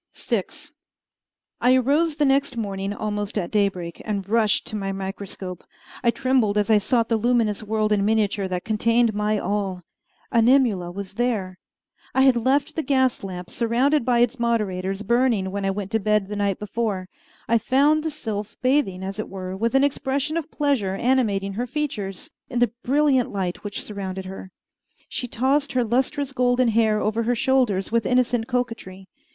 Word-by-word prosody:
VI - - -1 1.2
I 250 +1 +5
arose 290 +5 +2
the 295 -1 +2
next 275 -2 +1
morning 195 -2 -3
almost 205 0 -3
at 175 -4 -2
daybreak, 195 -5 -1
and 200 -3 -3
rushed 215 -1 +2
to - - -6
my 195 -2 -2
microscope, 195 -1 -6 0.4
I 240 - +4
trembled 255 -5 +1
as 210 +2 +2
I 215 - +6
sought 230 +2 +1
the 230 - +1
luminous 225 -2 +1
world 215 0 -1
in 205 -1 +2
miniature 205 -2 +1
that 180 -1 -4
contained 230 +1 +2
my 210 +1 0
all. 195 -2 -2 0.5
Animula 230 -6 +3
was 190 +1 -7
there. 210 -7 -1 0.6
I 265 - +4
had 265 -2 +5
left 260 +4 +1
the 320 - 0
gas 260 -5 +1
lamp, 180 -2 -7
surrounded 250 +5 +2
by 240 -1 +2
its 245 +2 +1
moderators, 200 -4 -1
burning 235 -4 +1
when 200 0 -3
I - - +1
went 195 0 -4
to 225 - +2
bed 210 -1 +1
the 210 - -4
night 200 -2 0
before. 210 -3 -3 0.4
I 230 0 +3
found 290 +6 +3
the 320 - -2
sylph 220 -8 -5
bathing, 255 -9 +1
as 195 +2 -5
it 215 - -4
were, 185 -1 -6
with 230 +6 -1
an 270 - +5
expression 280 +2 -1
of 330 -1 -3
pleasure 270 -12 0
animating 205 -5 +1
her 240 +5 -3
features, 240 -9 -4 0.2
in 245 - -4
the 240 -2 +3
brilliant 275 -2 +2
light 185 -3 -3
which 205 0 -5
surrounded 190 -2 -5
her. 190 0 -8 0.6
She 250 - -3
tossed 270 +5 0
her 255 -1 +2
lustrous 265 +4 -1
golden 250 -1 +2
hair 220 -1 +2
over 220 +2 0
her 240 +2 +1
shoulders 235 -7 +1
with 230 -1 +1
innocent 245 -2 +1
coquetry. 230 -7 -4
220 Hz, 175 wpm, -23 LUFS, 195-255 Hz, 1.2 s, I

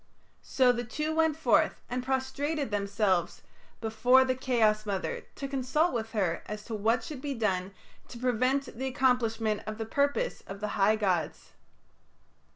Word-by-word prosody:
So 255 -2 +3
the 240 0 -2
two 305 +6 -3
went 320 -1 +2
forth 320 - +2
and 250 0 -3
prostrated 270 +1 -2
themselves 200 -3 0 0.4
before 240 +4 +4
the 260 - +1
Chaos 230 -5 +2
Mother 195 -2 -3
to 275 - -5
consult 275 +5 +1
with 225 -1 -3
her 185 -6 0
as 210 0 -6
to 230 - -6
what 225 +3 +1
should 275 +1 -7
be 280 -1 -3
done 190 -4 -1 0.4
to 240 - -10
prevent 255 +3 0
the 265 - -1
accomplishment 235 -5 +1
of 215 0 -4
the 225 - -3
purpose 285 - 0
of 195 +1 -7
the 210 0 -3
high 205 +2 +3
gods. 190 -6 -1
240 Hz, 160 wpm, -29 LUFS, 215-265 Hz, 0.4 s, before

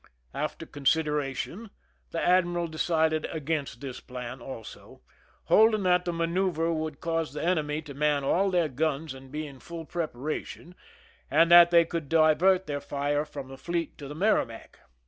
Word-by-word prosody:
After - - -4
consideration 150 +7 -1 0.4
the 165 - -3
admiral 175 -1 +2
decided 160 -1 0
against 150 -6 -3
this 135 -3 -6
plan 125 0 -8
also, 120 -3 -10 0.4
holding 215 -1 +4
that 180 -1 +3
the 175 - 0
manoeuver 170 0 0
would 155 -2 -4
cause 165 -3 -2
the 150 - -4
eneiay 155 -3 0
to 145 - -8
man 145 0 +1
all 190 +8 +2
their 175 -3 +2
guns 150 +2 -2
and 130 0 -13
be 155 +1 -4
in 140 -3 -11
full 165 +3 -8
preparation, 155 +2 -5 0.6
s.nd 165 +4 +4
that 175 0 +9
they 170 -1 +5
could 165 -4 -4
divert 165 +4 +4
their 145 -1 -3
fire 145 +1 -1
from 140 -3 -8
the 135 - -9
fieet 170 0 -3
to 140 - -7
the 145 - -8
Merrimac. 160 - -1
155 Hz, 160 wpm, -28 LUFS, 145-170 Hz, 0.6 s, that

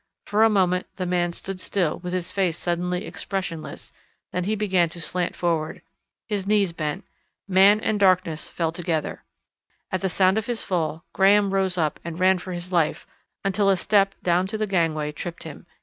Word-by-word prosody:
For 210 +2 +3
a 225 - +6
moment 185 -3 +2
the 185 - -3
man 175 -1 +1
stood 190 +2 -6
still 180 -4 -1
with 180 0 -5
his 180 -1 -3
face 180 -4 0
suddenly 180 +1 -2
expressionless, 185 -5 -5 0.4
then 180 -1 -2
he 215 +2 0
began 190 -5 +2
to 170 - -8
slant 175 +1 -2
forward. 165 -3 -1 0.4
His 205 -4 -2
knees 200 -4 +2
bent. 155 +3 -3 0.4
Man 195 +2 +6
and 215 -1 0
darkness 185 -5 +2
fell 165 -2 -1
together. 165 -2 -3 0.7
At 185 - -1
the 190 - 0
sound 190 +3 +3
of 220 - -7
his 240 -2 -2
fall 165 -3 -2
Graham 200 0 +4
rose 190 -2 +1
up 155 -3 0
and 170 0 -6
ran 185 0 +4
for 185 - -7
his 175 +1 -6
life 165 -4 +1 0.4
until 195 +1 +2
a 195 - +4
step 195 +1 +2
down 180 +1 +2
to 215 +2 -4
the 215 - 0
gangway 165 -6 0
tripped 170 +3 -6
him. 160 +2 -10
180 Hz, 185 wpm, -24 LUFS, 170-195 Hz, 0.7 s, a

